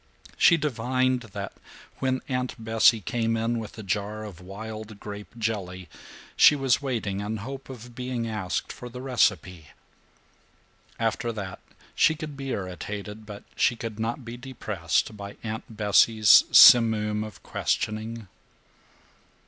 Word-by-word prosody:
She 170 Hz, -, +5 dB
divined 130 Hz, -2 st, 0 dB
that 100 Hz, -3 st, -7 dB, 0.5 s
when 130 Hz, -1 st, 0 dB
Aunt 125 Hz, -1 st, -2 dB
Bessie 115 Hz, 0 st, +3 dB
came 115 Hz, +2 st, -1 dB
in 115 Hz, +1 st, -1 dB
with 110 Hz, 0 st, -8 dB
a 110 Hz, -, -7 dB
jar 105 Hz, +2 st, -3 dB
of 95 Hz, -5 st, -10 dB
wild 110 Hz, +2 st, -8 dB
grape 105 Hz, +3 st, -9 dB
jelly 95 Hz, -5 st, -4 dB, 0.5 s
she -, -, +7 dB
was 135 Hz, -2 st, +1 dB
waiting 115 Hz, -8 st, -2 dB
in 105 Hz, +2 st, -3 dB
hope 135 Hz, +6 st, -8 dB
of 120 Hz, -2 st, -10 dB
being 125 Hz, -1 st, -3 dB
asked 105 Hz, -5 st, -3 dB
for 125 Hz, -2 st, -9 dB
the 125 Hz, +1 st, -9 dB
recipe. 95 Hz, -, 0 dB, 1.3 s
After 115 Hz, +1 st, -1 dB
that 100 Hz, -4 st, -6 dB, 0.3 s
she 160 Hz, -, +3 dB
could 150 Hz, -2 st, -7 dB
be 135 Hz, -1 st, -6 dB
irritated 105 Hz, +1 st, -6 dB
but 105 Hz, -1 st, -9 dB
she 120 Hz, -, +2 dB
could 115 Hz, -2 st, -6 dB
not 115 Hz, +3 st, -3 dB
be 120 Hz, +1 st, -7 dB
depressed 110 Hz, -8 st, -2 dB
by 100 Hz, -1 st, -9 dB
Aunt 110 Hz, 0 st, -5 dB
Bessie's 105 Hz, +1 st, +6 dB
simoom 110 Hz, -3 st, +7 dB
of 110 Hz, -4 st, -10 dB
questioning. 110 Hz, 0 st, -2 dB
110 Hz, 135 wpm, -26 LUFS, 105-125 Hz, 1.3 s, she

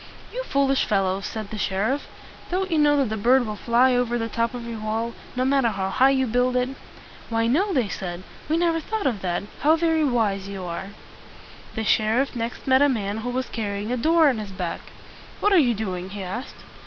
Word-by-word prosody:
"You -, -, -2 dB
foolish 275 Hz, -, +2 dB
fellows!" 195 Hz, -1 st, 0 dB
said 215 Hz, -2 st, -6 dB
the 215 Hz, -, -5 dB
sheriff. 210 Hz, +9 st, -1 dB, 0.4 s
"Don't 375 Hz, +1 st, -1 dB
you 320 Hz, -, +2 dB
know 295 Hz, -1 st, +4 dB
that 270 Hz, -5 st, +1 dB
the 220 Hz, -, -2 dB
bird 245 Hz, +4 st, +4 dB
will 215 Hz, -1 st, -4 dB
fly 240 Hz, +4 st, +3 dB
over 245 Hz, -1 st, +1 dB
the 225 Hz, -1 st, -2 dB
top 230 Hz, +2 st, -1 dB
of 240 Hz, -1 st, -6 dB
your 230 Hz, -2 st, -5 dB
wall, 220 Hz, +2 st, -2 dB, 0.2 s
no 255 Hz, 0 st, +1 dB
matter 270 Hz, -2 st, +3 dB
how 195 Hz, -3 st, -2 dB
high 265 Hz, +5 st, +5 dB
you 265 Hz, -1 st, +2 dB
build 250 Hz, +2 st, +1 dB
it?" 250 Hz, 0 st, +1 dB, 0.6 s
"Why, 225 Hz, 0 st, +1 dB
no," 340 Hz, -, +2 dB
they 255 Hz, -, +1 dB
said. 180 Hz, -2 st, -5 dB, 0.3 s
"We 320 Hz, -, +2 dB
never 335 Hz, -1 st, +2 dB
thought 435 Hz, +6 st, -3 dB
of 230 Hz, -7 st, 0 dB
that. 175 Hz, 0 st, -1 dB, 0.2 s
How 310 Hz, +2 st, +4 dB
very 325 Hz, -1 st, +2 dB
wise 215 Hz, -8 st, +1 dB
you 195 Hz, -2 st, -6 dB
are!" 175 Hz, +2 st, -5 dB, 0.9 s
The 220 Hz, -, -2 dB
sheriff 225 Hz, +6 st, +2 dB
next 235 Hz, 0 st, -4 dB
met 260 Hz, 0 st, +4 dB
a 285 Hz, -, +5 dB
man 210 Hz, -5 st, -1 dB
who 230 Hz, +3 st, -4 dB
was 255 Hz, 0 st, -2 dB
carrying 205 Hz, 0 st, -3 dB
a 250 Hz, -, 0 dB
door 320 Hz, +5 st, +4 dB
on 255 Hz, -6 st, +2 dB
his 210 Hz, -2 st, -6 dB
back. 180 Hz, -3 st, -4 dB, 0.6 s
"What 415 Hz, -, +3 dB
are 375 Hz, -, +7 dB
you 245 Hz, -6 st, +3 dB
doing?" 185 Hz, -3 st, -4 dB
he 200 Hz, 0 st, -6 dB
asked. 220 Hz, +9 st, -6 dB
235 Hz, 215 wpm, -24 LUFS, 205-270 Hz, 0.9 s, are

